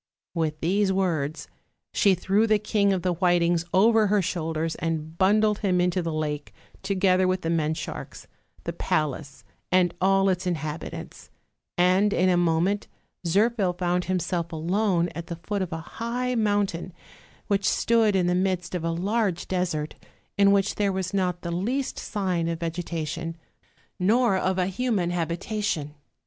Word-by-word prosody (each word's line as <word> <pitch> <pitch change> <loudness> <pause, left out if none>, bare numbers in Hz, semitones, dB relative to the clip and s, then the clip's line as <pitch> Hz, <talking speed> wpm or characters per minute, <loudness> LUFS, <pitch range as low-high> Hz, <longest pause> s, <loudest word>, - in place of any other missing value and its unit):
With 160 -2 -2
these 195 +4 +2
words 160 -6 -1 0.5
she 200 -3 +4
threw 195 +5 +2
the 215 -1 +4
King 205 -1 +1
of 185 -2 -1
the 180 -1 +1
Whitings 175 -1 +2
over 220 +2 +4
her 205 +1 +3
shoulders 165 -3 -2
and 160 -1 -3
bundled 210 +3 +3
him 185 -4 +1
into 180 0 +1
the 165 -1 -3
lake, 150 -1 -3 0.3
to 195 +1 -2
gether 185 -1 +3
with 185 0 0
the 165 - -1
men 160 -1 +1
sharks, - - -7 0.4
the - - -4
palace 140 -3 -2 0.3
and 180 -2 +3
all 195 +1 +4
its 185 -1 0
inhab 155 -2 -2
itants; - - -9 0.5
and 185 +3 +4
in 185 +1 +3
a 180 - +4
moment 175 +4 +1 0.4
Zirphil 200 -1 +2
found 180 0 0
himself 175 -2 -1
alone 175 +2 +1
at 170 +1 -7
the 170 - -4
foot 205 -2 -2
of 185 -2 -3
a 160 0 -5 0.2
high 250 +2 -1
mountain, 205 -6 0 0.5
which 200 0 +1
stood 225 -3 +2
in 185 -2 +2
the 175 - +2
midst 185 -1 -1
of 180 -3 -2
a 165 - 0
large 195 +2 -1
desert 175 -5 -1 0.4
in 200 0 +5
which 200 0 +2
there 205 -1 0
was 190 -1 -3
not 180 -3 -1
the 170 - -3
least 240 +10 -2
sign 185 -5 -1
of 165 0 -3
vegetation, 165 -1 -4 0.6
nor 220 +3 +3
of 190 0 0
a 180 - +2
human 195 -3 0
habitation. 170 -2 -2
180 Hz, 160 wpm, -25 LUFS, 165-200 Hz, 0.6 s, in